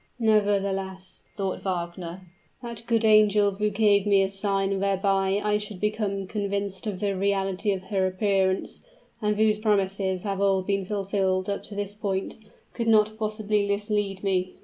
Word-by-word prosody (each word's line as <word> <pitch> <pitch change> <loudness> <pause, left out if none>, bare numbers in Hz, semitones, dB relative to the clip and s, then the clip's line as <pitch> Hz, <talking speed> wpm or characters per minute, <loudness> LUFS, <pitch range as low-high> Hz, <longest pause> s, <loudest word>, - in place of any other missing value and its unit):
"Nevertheless," 195 -4 0
thought 195 -2 -3
Wagner, 175 -1 -4 0.4
"that 235 -1 -7
good 230 -1 +2
angel 210 -1 +5
who 210 +2 -1
gave 205 -1 +3
me 200 -1 +5
a 190 - -2
sign 195 -1 -1
whereby 195 0 +1
I 210 0 +1
should 210 -2 -7
become 210 -2 -1
convinced 200 0 -3
of 195 -3 -3
the 200 -1 -1
reality 195 +1 0
of 190 -1 -3
her 190 -1 0
appearance, 190 0 0 0.4
and 210 -1 0
whose 215 -1 +3
promises 195 -3 0
have 200 -2 -2
all 195 -1 +2
been 195 0 -1
fulfilled 195 -1 -1
up 200 - -3
to 205 - -8
this 205 0 -3
point, 200 -2 -3 0.4
could 230 -1 -3
not 215 -1 +4
possibly 215 -1 0
mislead 200 -1 -1
me. 185 -2 0
200 Hz, 155 wpm, -26 LUFS, 190-210 Hz, 0.4 s, angel